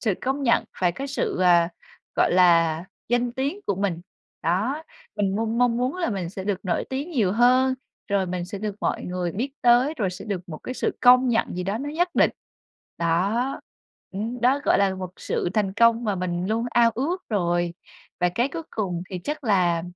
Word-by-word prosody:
sự 215 -5 +1
công 270 +2 -1
nhận, 235 -3 +3 0.2
phải 175 -1 +3
có 275 +9 -5
sự, 275 -8 -2
à, 175 -2 +5 0.5
gọi - - +3
là, 170 -2 +4 0.2
danh 240 0 +1
tiếng 280 +10 -2
của 200 - +1
mình. 190 -4 -1 0.4
Đó, 215 - 0 0.3
mình 200 -1 0
mong 225 +1 -1
mong 245 -1 +3
muốn 255 +7 -1
là 345 -9 -1
mình 185 -4 -3
sẽ 190 -1 -6
được 200 -1 -1
nổi 180 - 0
tiếng 280 +6 -3
nhiều 215 - +1
hơn, 255 +3 +4 0.3
rồi 200 -2 +1
mình 180 0 -3
sẽ 195 +3 -7
được 210 0 -3
mọi - - -1
người 180 -1 -3
biết 255 +7 -3
tới, 245 +5 +4
rồi 195 -5 0
sẽ 180 - -8
được 190 -4 -4
một 155 - -7
cái 255 - -6
sự - - -2
công 250 +1 +6
nhận 230 -1 +2
gì 180 - -3
đó 200 +4 -2
nó 290 +2 -4
nhất 345 +4 +1
định. - - +4 0.7
Đó. 195 +11 0 0.5
Ừm, 225 +5 -4
đó 260 +4 +3
gọi - - +4
là 195 -1 +2
một 185 -1 -6
sự - - -2
thành 200 -3 +1
công 230 0 +4
mà 210 - 0
mình 180 -1 -2
luôn 230 +2 0
ao 235 0 +4
ước 340 +9 -2
rồi. 175 -4 0 0.5
Và 180 - +4
cái 240 +9 0
cuối 325 +3 -5
cùng 180 -5 -2
thì 185 - -4
chắc 295 -1 -4
là 180 -6 +2
210 Hz, 210 wpm, -24 LUFS, 180-250 Hz, 0.7 s, công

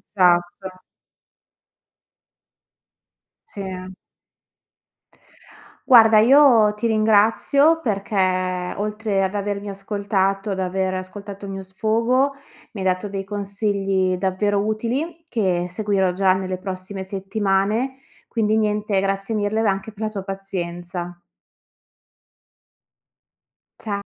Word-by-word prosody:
Esatto. 180 0 +2 2.8
Sì. 185 -2 -7 1.9
Guarda, 225 -4 +7
io 235 -3 +6
ti 210 +2 -2
ringrazio 225 +9 +3
perché 185 - -1
oltre 210 -1 -1
ad 190 +2 -2
avermi 205 0 -3
ascoltato, 195 0 -1
ad 190 -1 -2
aver 185 0 -1
ascoltato 200 +2 -7
il 195 - -6
mio 195 0 -5
sfogo, 230 +8 +1 0.4
mi 200 - -7
hai 190 - 0
dato 185 +2 0
dei 195 -1 -4
consigli 195 -2 -1
davvero 200 +2 0
utili 260 +10 -3
che 180 -6 0
seguirò 195 -1 0
già 185 0 +3
nelle 185 -1 -3
prossime 190 +1 -6
settimane. 200 +5 -1 0.3
Quindi, 220 -1 +1
niente, 210 -2 0
grazie 195 +2 -1
mille 210 +1 0
v - - 0
anche 195 +2 -1
per 210 - -14
la - - -1
tua 200 -3 -6
pazienza. 175 -2 -5 2.6
Cia 200 -2 -4
200 Hz, 100 wpm, -22 LUFS, 190-215 Hz, 2.8 s, Guarda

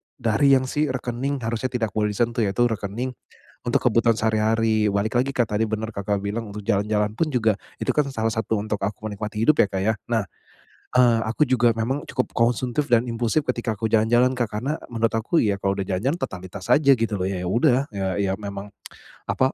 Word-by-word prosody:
dari 135 +5 +3
yang 130 - +2
si 150 0 +1
rekening 130 +1 -3
harusnya 115 +3 -1
tidak 115 -4 -2
boleh 105 0 -1
disentuh, 120 +2 0
yaitu 100 +5 +1
rekening 115 +3 -3 0.5
untuk - - 0
kebutuhan 115 0 +3
sehari-hari. 110 0 +2
Balik 100 +3 -1
lagi 135 +2 0
Kak, 120 -3 +1
tadi 110 - +2
benar 110 +1 -3
Kakak 100 0 -2
bilang, 110 +3 -3
untuk 105 0 -7
jalan-jalan 105 0 +1
pun 165 - +1
juga 110 -4 +2 0.2
itu - - 0
kan 150 -2 +1
salah 110 -2 -1
satu 110 0 -1
untuk 105 0 -3
aku 100 +1 -3
menikmati 105 +1 -4
hidup 155 +4 +4
ya - - 0
Kak 95 -1 -3
ya. 110 +2 +2 0.2
Nah, 110 -3 +2 0.7
eee, 120 -2 +5
aku 115 +7 -1
juga 120 -2 +3
memang 130 +6 -1
cukup 130 - -2
konsumtif 125 +4 +1
dan 120 0 +4
impulsif 120 +6 0
ketika 120 -3 -1
aku 110 - -1
jalan-jalan 120 +4 +3
Kak, 120 -4 0
karena, 140 +7 -2 0.2
menurut 115 -1 +1
aku 115 +10 +1
ya 100 -3 +1
kalau 95 0 0
udah 95 - -2
jalan-jalan 125 - -1
totalitas 95 +1 -6
aja 140 -2 +6
gitu 115 -2 -1
loh, 90 - -1
ya 95 -2 -3
ya 90 - -2
udah, 125 +4 +3
ya 100 -3 -3
ya 100 -1 +1
memang 100 -1 -7 0.6
apa, 130 +1 +1
115 Hz, 205 wpm, -23 LUFS, 105-125 Hz, 0.7 s, aja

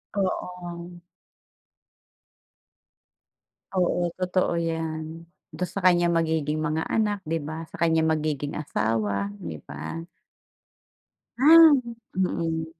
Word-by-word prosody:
Oo. 175 -2 -4 2.7
Oo, 175 -2 +1
totoo 185 -1 +1
'yan. 160 0 -4 0.3
Do'n 180 - -3
sa 200 - -4
kaniyang 175 -1 +4
magiging 160 -2 0
mga 155 +1 -1
anak, 210 -3 0
'di 165 +1 -1
ba? 160 +3 -6
Sa - - -10
kaniyang 160 -1 +3
magiging 150 -2 -2
asawa, 105 -7 -1
'di 80 -2 -6
ba? 80 - -6 1.3
Ah, 320 +3 +9 0.4
mm. 165 -3 -1
165 Hz, 95 wpm, -25 LUFS, 155-180 Hz, 2.7 s, Ah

